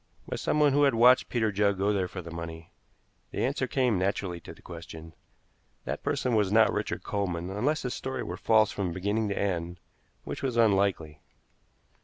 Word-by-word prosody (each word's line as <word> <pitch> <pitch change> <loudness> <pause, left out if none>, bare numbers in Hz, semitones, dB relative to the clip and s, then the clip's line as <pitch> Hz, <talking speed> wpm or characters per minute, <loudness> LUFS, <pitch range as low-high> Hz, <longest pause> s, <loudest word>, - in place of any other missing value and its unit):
By - - -3
someone 150 -2 +2
who 145 - +3
had 140 -4 +4
watched 125 +3 +5
Peter 110 -3 +1
Judd 100 -1 +1
go 100 +2 +1
there 95 -2 0
for 90 0 -7
the 85 - -9
money. 85 0 -7 0.6
The - - -1
answer 130 0 -1
came 125 -8 +1
naturally 95 -2 -1
to - - -11
the - - -16
question. 80 -1 -10 0.7
That - - -4
person 125 - -1
was 105 -3 +2
not 110 +1 +5
Richard - - -3
Coleman, 90 -3 -2
unless 140 +11 0
his 125 - -2
story 130 0 -4
were - - -5
false 110 -2 +3
from 95 -4 -3
beginning 105 +4 -1
to 100 - -3
end, 90 -3 -2 0.4
which - - -6
was 130 -3 -2
unlikely. 95 -8 +2
100 Hz, 185 wpm, -28 LUFS, 90-120 Hz, 0.7 s, watched